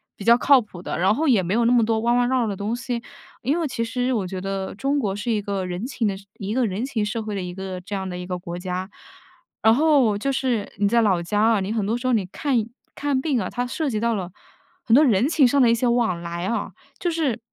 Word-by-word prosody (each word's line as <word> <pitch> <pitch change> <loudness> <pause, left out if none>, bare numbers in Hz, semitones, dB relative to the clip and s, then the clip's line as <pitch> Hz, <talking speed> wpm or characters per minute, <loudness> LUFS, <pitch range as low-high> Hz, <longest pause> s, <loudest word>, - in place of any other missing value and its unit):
比 200 - -9
较 235 +1 +7
靠 275 -1 +5
谱 185 -5 -11
的， - - -4
然 190 +3 +4
后 315 +5 0
也 235 -8 +4
没 180 - -1
有 235 +1 +2
那 235 - +4
么 235 - +5
多 220 0 +1
弯 235 +1 +2
弯 245 - +3
绕 260 -1 +2
绕 - - -1
的 200 - -2
东 205 +4 -3
西。 245 -1 -4 0.4
因 275 +7 0
为 335 - 0
其 230 -2 -2
实 250 +2 -1
我 205 -6 -1
觉 185 0 -5
得 195 0 -4
中 275 +6 0
国 200 -6 -1
是 210 +3 -2
一 215 - +1
个 200 -2 -3
人 180 +4 -4
情 245 -5 -2
的 195 - -1 0.2
一 200 0 -3
个 255 0 +2
人 205 +6 -2
情 225 -6 -1
社 220 +1 -3
会 215 - -5
的 195 - -2
一 180 -1 -5
个 190 0 -6
这 200 +2 -6
样 190 -1 -3
的 180 - -5
一 180 - -6
个 180 -1 -3
国 175 -1 -7
家， 185 +1 -4 0.7
然 220 0 +6
后 275 -8 +3
就 275 +7 -2
是 255 -5 -1
你 200 0 +2
在 235 +2 +4
老 190 -6 +2
家 205 +4 0
啊， 225 -1 +4
你 190 - -3
很 215 -3 -1
多 225 +4 0
时 245 - -8
候 255 - +2
你 210 -5 +1
看 275 +7 -2 0.4
看 285 -2 0
病 275 -4 0
啊， 185 - -3
它 245 +1 -2
涉 285 +4 -2
及 220 - -2
到 235 +1 +1
了 185 -3 -4 0.5
很 230 - +1
多 295 - +7
人 230 0 +3
情 295 -5 +5
上 275 +2 +3
的 240 - +5
一 - - +4
些 245 +1 0
往 230 -8 +1
来 170 +1 -4
啊。 220 -3 -2 0.3
就 350 - 0
是 295 -8 -1
225 Hz, 300 characters per minute, -23 LUFS, 195-250 Hz, 0.7 s, 较